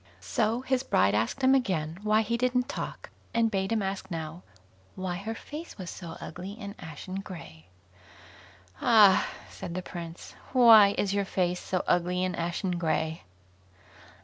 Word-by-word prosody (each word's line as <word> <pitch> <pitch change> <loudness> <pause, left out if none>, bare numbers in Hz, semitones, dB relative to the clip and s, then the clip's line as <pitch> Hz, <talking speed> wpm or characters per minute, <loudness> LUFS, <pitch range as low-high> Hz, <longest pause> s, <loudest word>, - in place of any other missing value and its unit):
So 225 +3 0
his 260 -1 0
bride 95 - +2
asked 110 - 0
him 260 +1 +6
again 180 - 0
why 215 +1 +3
he 235 +2 -1
didn't 250 +1 +1
talk, - - -6 0.2
and 230 -1 +3
bade 195 -1 -1
him 220 -3 +1
ask 190 0 -4
now, 165 0 -5 0.5
why 185 -1 -3
her 220 +4 -5
face 305 +7 -8
was 185 -4 -6
so 170 -3 -8
ugly 185 +5 -7
and 200 -2 -6
ashen 175 +5 -7
grey? 125 - -10 1.1
"Ah!" 210 -5 +6 0.2
asked - - -8
the 185 - -2
Prince, 170 -1 -8 0.2
"why 225 -5 +8
is 200 -1 0
your 200 -1 +1
face 180 -2 0
so 185 - -2
ugly 180 +1 +1
and 180 -1 -2
ashen 175 +1 -2
grey?" 160 - -1
190 Hz, 155 wpm, -28 LUFS, 170-220 Hz, 1.1 s, why